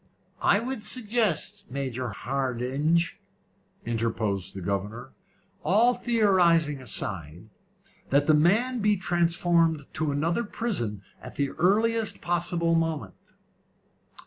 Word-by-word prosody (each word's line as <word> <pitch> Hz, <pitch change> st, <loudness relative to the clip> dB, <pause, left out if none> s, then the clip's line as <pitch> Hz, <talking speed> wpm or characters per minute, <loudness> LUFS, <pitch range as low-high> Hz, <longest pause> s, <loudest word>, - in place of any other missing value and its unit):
"I -, -, +4 dB
would 240 Hz, -1 st, -4 dB
suggest, 210 Hz, -, -1 dB
Major 130 Hz, -2 st, -3 dB
Hardinge," 135 Hz, -, -1 dB, 0.7 s
interposed 110 Hz, -5 st, -2 dB
the 95 Hz, -, -6 dB
governor, 105 Hz, +7 st, -3 dB, 0.5 s
"all 230 Hz, +6 st, +4 dB
theorising 175 Hz, -, +2 dB
aside, 90 Hz, -, -3 dB, 0.6 s
that 140 Hz, +1 st, +3 dB
the 155 Hz, -, +4 dB
man 215 Hz, +12 st, +3 dB
be 210 Hz, -1 st, +2 dB
transferred 170 Hz, -3 st, +1 dB
to 155 Hz, -2 st, -1 dB
another 165 Hz, +10 st, 0 dB
prison 150 Hz, -, -3 dB, 0.2 s
at -, -, -10 dB
the 140 Hz, -1 st, 0 dB
earliest 220 Hz, +4 st, +1 dB
possible 170 Hz, -1 st, 0 dB
moment." 165 Hz, -2 st, -1 dB
165 Hz, 100 wpm, -27 LUFS, 125-205 Hz, 0.7 s, I